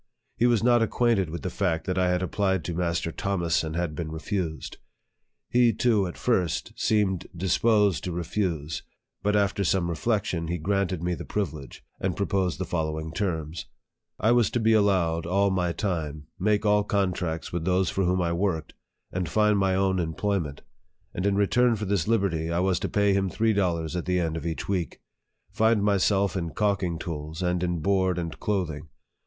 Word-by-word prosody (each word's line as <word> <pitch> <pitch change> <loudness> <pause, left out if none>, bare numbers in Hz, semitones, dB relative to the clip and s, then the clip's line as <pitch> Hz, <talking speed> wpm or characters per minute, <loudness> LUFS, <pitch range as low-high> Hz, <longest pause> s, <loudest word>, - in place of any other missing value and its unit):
He 120 - +3
was 120 -3 +2
not 120 -1 +5
acquainted 115 -4 +2
with 85 +2 -6
the 90 - -3
fact 90 -5 -1
that 95 -1 -1
I 90 -1 +2
had 90 0 +1
applied 95 -1 0
to 85 - -3
Mas 85 0 0
ter 85 - -4
Thomas, 85 -4 0
and 80 0 -4
had 85 -2 -1
been 80 0 -5
refused. 80 0 -4 0.7
He 120 -1 +4
too, 105 -3 +2
at 85 - -8
first, 95 -10 0
seemed 100 -5 +1
disposed 100 - +2
to 90 - -2
refuse; 85 -3 -2 0.4
but, 105 +1 +1
after 100 -1 +1
some 85 -1 +1
reflection, 90 -2 -1
he 85 +1 -1
granted 95 0 -1
me 90 0 0
the - - -5
privilege, 80 -10 -4
and 90 -3 -2
proposed 95 - 0
the - - -3
follow 80 -2 -2
ing 80 0 -6
terms: 80 -3 -3 0.5
I 110 - +3
was 120 -2 +4
to 120 - -1
be 110 0 +3
allowed 90 -6 +2
all 100 +2 +2
my 90 -2 0
time, 80 -6 -3
make 105 +2 +1
all 105 0 +4
contracts 90 -6 -1
with 85 -2 -2
those 90 0 +2
for 95 - 0
whom 90 0 +1
I 85 0 0
worked, 85 -3 -1 0.4
and 90 -3 -2
find 105 +2 +3
my 95 -1 +2
own 95 -1 +1
employment; 80 -2 -2 0.5
and, 90 +3 -1
in 100 - +2
return 120 +4 +3
for 105 0 -4
this 95 -4 0
liberty, 95 -8 +1
I 85 - -1
was 90 -1 +1
to - - -3
pay 100 -1 +2
him 95 -1 +1
three 110 +3 +1
dollars 85 -5 0
at 90 - -2
the 90 0 +1
end 80 -2 -1
of 80 +1 -4
each 80 - -4
week; 90 -4 -2 0.5
find 110 -1 +2
myself 100 -1 +2
in 85 -3 -3
calking 100 -6 0
tools, 80 0 -5
and 90 0 0
in 90 -2 -1
board 95 0 +1
and 85 -3 -4
clothing. 90 -7 -2
90 Hz, 190 wpm, -26 LUFS, 85-100 Hz, 0.7 s, not